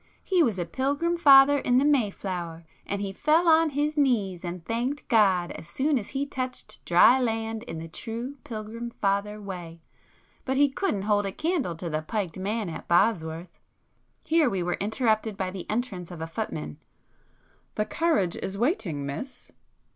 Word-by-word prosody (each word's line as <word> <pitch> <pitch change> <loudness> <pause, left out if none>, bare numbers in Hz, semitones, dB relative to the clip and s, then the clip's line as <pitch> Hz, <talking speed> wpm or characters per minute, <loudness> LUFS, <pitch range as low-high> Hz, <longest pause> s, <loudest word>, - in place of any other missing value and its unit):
He 370 -3 +2
was 230 - +2
a 175 - -1
Pilgrim 285 - 0
Father 285 -3 +7
in 245 -1 +2
the 270 - +4
Mayflower, 190 - -1 0.2
and 200 0 -2
he 195 -1 -4
fell 315 - +2
on 325 0 +5
his 295 +1 -1
knees 215 - +1
and 175 -1 -6
thanked 245 +6 -2
God 190 -6 +3
as 165 - -9
soon 275 - +1
as 205 - -8
he 275 +1 -2
touched 255 -2 -6
dry 180 +9 +6
land 225 -2 -1
in 235 -9 -7
the 165 +1 -6
true 235 - -6
Pilgrim 225 +1 -6
Father 205 -1 -1
way. 175 -5 -8 0.6
But 265 0 -1
he 285 0 +5
couldn't 270 - -1
hold 205 -1 +1
a - - -3
candle 310 - -1
to 170 +2 -6
the 155 -1 -2
piked 190 0 -3
man 210 +2 -2
at 160 - -7
Bosworth." 170 -2 +1 0.6
Here 320 -4 +3
we 190 -5 -1
were 175 - -1
interrupted 220 -1 0
by 185 -1 -2
the 185 -2 -8
entrance 210 -6 -3
of 175 -3 -9
a 160 - -3
footman. 75 - -5 1.0
"The 210 - 0
carriage 260 - +1
is 190 +1 -4
waiting, 195 - -1
Miss." 140 - -7
215 Hz, 170 wpm, -26 LUFS, 180-270 Hz, 1.0 s, Father